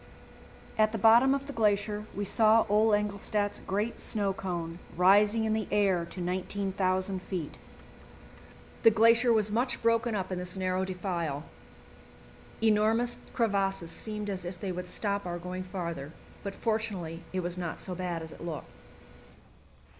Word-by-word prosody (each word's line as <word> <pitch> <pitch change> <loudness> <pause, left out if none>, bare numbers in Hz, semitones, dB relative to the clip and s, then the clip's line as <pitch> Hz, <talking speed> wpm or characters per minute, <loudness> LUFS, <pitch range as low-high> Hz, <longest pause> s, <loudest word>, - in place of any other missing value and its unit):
At 215 0 +4
the - - -1
bottom 235 +5 +6
of 275 0 -4
the 285 - -7
glacier 210 -1 +1
we 205 - -2
saw 220 +2 +4
Ole 215 +2 +4
Engelstad's 205 0 0
great 210 +4 -2
snow 200 -3 0
cone 170 -3 -4 0.2
rising 205 +4 +5
in 220 - +1
the 220 -1 -1
air 195 -4 +2
to 185 - -8
19,000 185 +1 -1
feet. 180 -6 -5 1.2
The - - +8
glacier 230 +2 +5
was 215 -2 +3
much 245 +4 +1
broken 230 0 +2
up 190 -2 -3
in 185 - -2
this 180 +1 -2
narrow 185 0 0
defile; 175 -6 -3 1.2
enormous 225 +2 +3
crevasses 195 -6 0
seemed 210 0 -4
as 190 -2 -3
if 175 0 -6
they 195 -3 -3
would 180 0 -5
stop 200 -2 -2
our 175 0 -3
going 180 +1 -5
farther, 170 -6 -5 0.3
but 200 -1 -5
fortunately 205 -7 -2
it 185 - -1
was 175 0 -2
not 175 -3 -4
so 185 - -5
bad 175 -2 -3
as 160 - -9
it - - -12
looked. 165 -3 -5
200 Hz, 155 wpm, -29 LUFS, 180-215 Hz, 1.2 s, The